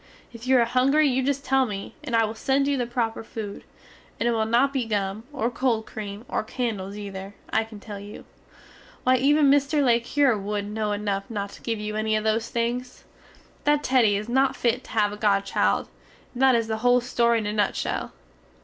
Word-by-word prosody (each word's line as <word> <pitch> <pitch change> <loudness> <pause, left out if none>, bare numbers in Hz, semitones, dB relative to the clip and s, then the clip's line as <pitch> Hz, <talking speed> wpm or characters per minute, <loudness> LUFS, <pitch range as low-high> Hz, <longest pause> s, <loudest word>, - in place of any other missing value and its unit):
If 235 +1 -9
you 260 0 +5
are 235 - +4
hungry 270 +6 +3
you 260 -1 +1
just 275 +1 -1
tell 265 -1 +3
me, 200 -2 -6
and 250 -6 -2
I 225 -1 +4
will 215 - -4
send 270 +4 +1
you 285 - +2
the 245 -3 -1
proper 230 -2 -2
food; 215 -2 -7 0.6
and 235 - +1
it - - +3
will 220 -1 0
not 250 +5 +3
be 255 -4 -1
gum, 205 0 -2
or 255 -4 -1
cold 235 -3 0
cream 210 +1 -7
or - - -1
candels 210 -5 -3
ether, 200 -1 -7 0.2
I 220 - +3
can 220 -2 -11
tell 205 -1 -8
you. 205 +1 -10 0.8
Why 255 0 +4
even 285 +2 +4
Mr. 285 +1 +3
le 235 -3 +4
Cure 265 +1 +2
wood 205 +1 -3
no 210 +1 -2
enuf 205 0 -2
not 200 -3 -4
to - - -13
give 225 -2 -2
you 210 0 -4
enny 215 0 0
of 215 - 0
those 220 +1 0
things. 245 +2 -3 0.6
That 295 0 +2
Teddy 235 -7 +3
is 210 +2 -5
not 265 +2 +2
fit 245 +1 0
to - - -14
have 210 -2 +1
a - - -7
godchild, 200 -2 +1 0.5
and 250 - -5
that 265 -2 +6
is 230 -1 +1
the 220 0 -2
hole 245 +2 +4
story 235 -1 +2
in 220 - -2
a 210 - -2
nutshell. 210 -1 -1
230 Hz, 215 wpm, -25 LUFS, 210-255 Hz, 0.8 s, that